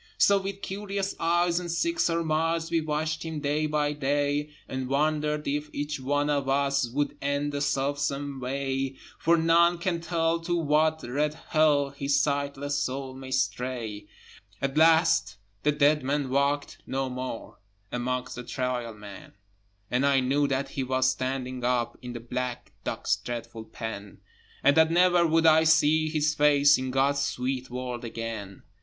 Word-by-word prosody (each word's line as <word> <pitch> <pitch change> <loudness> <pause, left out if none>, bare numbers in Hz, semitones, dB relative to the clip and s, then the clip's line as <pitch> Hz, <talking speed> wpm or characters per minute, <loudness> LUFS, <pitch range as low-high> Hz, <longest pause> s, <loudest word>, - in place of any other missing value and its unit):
So 200 -1 +4
with 195 +1 -6
curious 195 0 -3
eyes 175 +1 +2
and 175 -1 -6
sick 335 - -1
surmise 165 - 0
We 165 -1 +2
watched 155 0 -2
him 160 -2 -4
day 150 +1 0
by 150 -1 0
day, 145 +1 0 0.2
And 130 -1 -4
wondered 150 +2 0
if 150 +1 -2
each 145 0 -3
one 145 +2 0
of 140 -2 0
us 140 -2 +1
Would 145 +4 -1
end 140 +1 -1
the 145 0 -3
self 140 0 0
same 140 -1 -2
way, 135 +1 -2 0.2
For 170 +1 +3
none 170 +1 +4
can 170 -1 -2
tell 165 -1 0
to 175 +1 -2
what 155 0 +2
red 145 +5 -1
Hell 150 -3 +3
His 140 0 0
sightless 145 0 -1
soul 130 0 -3
may 130 0 -9
stray. 125 -5 -2 0.5
At 135 0 -2
last 160 - +4 0.3
the 150 - +2
dead 150 +1 +3
man 140 0 -1
walked 140 +1 0
no 135 0 -1
more 125 -2 -6 0.3
Amongst 125 +1 -2
the 125 - -5
Trial 125 -3 -3
Men, 105 -2 -11 0.6
And 125 +2 +1
I 140 -1 +4
knew 140 +3 +1
that 135 0 -1
he 135 - -4
was 130 0 +2
standing 130 -1 -3
up 120 -1 0
In 125 -1 -7
the 120 - -5
black 125 +1 -4
dock's - - -1
dreadful 115 -2 -6
pen, 105 -4 -7 0.5
And 140 +1 +5
that 160 0 +6
never 175 0 +4
would 165 +1 +2
I 160 0 +6
see 155 0 +4
his 150 -1 +1
face 145 -1 +5
In 130 0 -3
God's 135 +2 +2
sweet 130 -1 -2
world 125 -1 -5
again. 115 -4 -6
140 Hz, 160 wpm, -27 LUFS, 130-155 Hz, 0.6 s, that